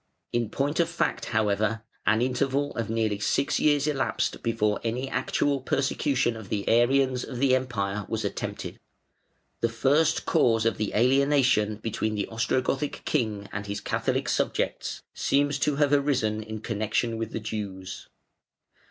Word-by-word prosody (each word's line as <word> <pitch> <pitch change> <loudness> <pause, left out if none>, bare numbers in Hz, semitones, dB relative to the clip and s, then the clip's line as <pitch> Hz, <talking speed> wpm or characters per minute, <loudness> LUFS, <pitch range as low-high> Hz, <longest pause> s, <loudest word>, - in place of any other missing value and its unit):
In 120 -2 0
point 145 +7 -1
of 170 -1 +3
fact, 170 - -1
however, 110 +1 0 0.2
an 110 +3 +4
interval 135 +3 0
of 115 -3 -2
nearly 110 -2 0
six 140 +6 +1
years 145 -2 +3
elapsed 145 -3 -1
before 105 -3 0
any 120 +3 -2
actual 140 0 0
persecution 135 -2 0
of 110 -4 -9
the 100 -2 -2
Arians 130 +2 +3
of 125 - -6
the 130 0 +4
Empire 105 -6 -2
was 110 -2 -2
attempted. 100 - -4 0.8
The 115 - +1
first 140 +7 +2
cause 115 -2 +3
of 115 - 0
alienation 125 -1 +3
between 110 0 -2
the 100 - -2
Ostrogothic 130 +5 -1
king 105 -4 -1
and 100 0 -5
his 100 0 -3
Catholic - - -1
subjects - - -1
seems 145 0 +1
to 150 0 +1
have 145 0 +2
arisen 130 -7 +1
in 110 0 -7
connection 110 +1 -1
with 115 -1 -3
the - - -3
Jews. 100 -4 -6
115 Hz, 145 wpm, -27 LUFS, 110-135 Hz, 0.8 s, an